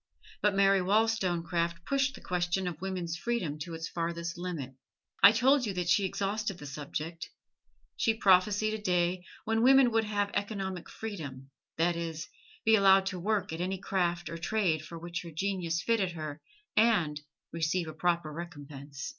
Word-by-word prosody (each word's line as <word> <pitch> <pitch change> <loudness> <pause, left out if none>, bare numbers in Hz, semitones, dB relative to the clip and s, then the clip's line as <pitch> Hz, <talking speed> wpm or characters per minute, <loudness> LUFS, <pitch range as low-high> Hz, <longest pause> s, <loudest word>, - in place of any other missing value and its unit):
But 205 -1 +2
Mary 195 -1 +4
Wollstonecraft 175 -5 +1
pushed 275 0 +1
the - - -12
question 180 +1 -1
of 170 -2 -5
woman's 180 -3 -3
freedom 180 -9 -2
to 165 +1 -5
its 165 0 -5
farthest 170 0 -3
limit; 170 -7 -5 0.5
I - - +10
told 255 +3 +3
you 195 - -3
that 175 -1 -1
she 195 +3 +4
exhausted 200 +1 -2
the 145 - -10
subject. 150 +3 -5 0.7
She 225 - +2
prophesied 205 +2 +3
a 220 - -4
day 180 -2 +1 0.2
when 225 0 +1
woman 265 0 +6
would 225 0 +2
have 205 -1 -1
economic 195 -3 -3
freedom 140 -11 -7 0.3
that 170 +1 +2
is, 165 -2 -4 0.4
be 220 - +5
allowed 195 -2 +6
to 185 -1 -3
work 205 -2 -1
at 165 - -4
any 190 +2 -1
craft 175 -3 -1
or 165 0 -6
trade 170 -4 0
for 170 - -8
which 170 +1 -5
her 170 - -9
genius 170 -1 -2
fitted 205 -6 +1
her 155 -2 -6 0.3
and 175 -10 +3 0.3
receive 165 +1 -1
a 155 - -6
proper 170 -1 0
recompense. 145 -4 -8
180 Hz, 165 wpm, -30 LUFS, 165-205 Hz, 0.7 s, I